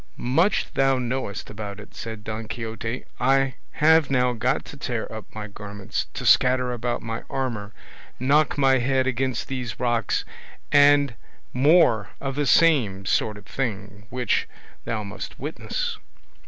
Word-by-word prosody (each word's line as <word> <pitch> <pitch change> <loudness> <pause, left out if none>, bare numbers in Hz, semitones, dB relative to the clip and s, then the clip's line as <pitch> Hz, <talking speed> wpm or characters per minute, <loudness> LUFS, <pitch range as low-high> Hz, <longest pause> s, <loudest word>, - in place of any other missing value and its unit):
"Much 165 +11 +1
thou 135 -1 +3
knowest 125 -5 -3
about 105 -1 -6
it!" 105 - -12
said 110 -2 -7
Don 110 0 -5
Quixote. 115 +1 -5
"I 135 +1 +3 0.2
have 160 -1 +4
now 125 -2 +2
got 110 - 0
to - - -10
tear - - -3
up - - -7
my 110 -1 -4
garments, 100 -1 -5
to - - -4
scatter 125 0 +4
about 120 0 -2
my 115 0 -4
armour, 115 -6 -3 0.5
knock 140 +4 +3
my 135 -2 +4
head 130 +1 +1
against 130 -1 -1
these 125 -4 -4
rocks, 120 -4 0 0.5
and 145 -2 +6 0.4
more 125 - +4
of 135 -1 -3
the 145 +1 -1
same 125 - +4
sort 105 +2 +1
of 100 - -13
thing, 105 -3 -4
which 125 -4 0 0.4
thou 110 -2 -2
must 100 +1 -7
witness." 440 - -3
125 Hz, 145 wpm, -24 LUFS, 110-135 Hz, 0.5 s, and